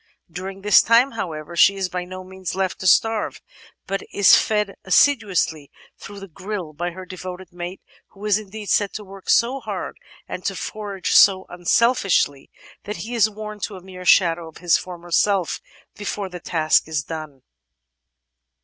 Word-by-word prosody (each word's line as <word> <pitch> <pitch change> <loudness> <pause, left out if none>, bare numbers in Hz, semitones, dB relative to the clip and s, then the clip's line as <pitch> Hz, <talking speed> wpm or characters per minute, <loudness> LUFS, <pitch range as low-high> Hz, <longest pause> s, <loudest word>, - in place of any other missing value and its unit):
During 190 +3 -7
this 210 -1 +7
time, 235 +4 +4
however, 165 -6 -5
she 200 +3 +6
is 190 -1 -1
by 180 0 -4
no 185 +1 -8
means 190 -1 -6
left 190 -1 -2
to 185 - -2
starve, 225 +3 +2 0.5
but 195 0 -2
is 200 - +7
fed 210 -2 +1
assiduously 190 - +2 0.3
through 200 0 -10
the 195 - -9
"grille" 185 -2 -6
by 175 +4 -3
her 185 +2 -9
devoted 185 0 -8
mate, 175 +2 -7 0.3
who 200 +1 -12
is 210 0 +3
indeed 210 0 -9
said 205 -2 +2
to 215 - -6
work 195 -1 -12
so 250 +4 +3
hard - - -6 0.3
and - - -6
to - - -1
forage 205 -3 -4
so 190 -1 +6
unselfishly 175 - +1 0.4
that 210 +1 -5
he 240 - -6
is 220 -2 +3
worn 215 0 -8
to 205 0 -4
a 185 - -11
mere 185 -1 -10
shadow 170 -2 +4
of 160 - -13
his 175 -1 +3
former 175 -1 -6
self 195 -1 +1 0.3
before 205 -1 -4
the 180 -1 -8
task 160 -3 +2
is 155 -3 -2
done. 155 -5 -8
190 Hz, 170 wpm, -22 LUFS, 175-210 Hz, 0.5 s, this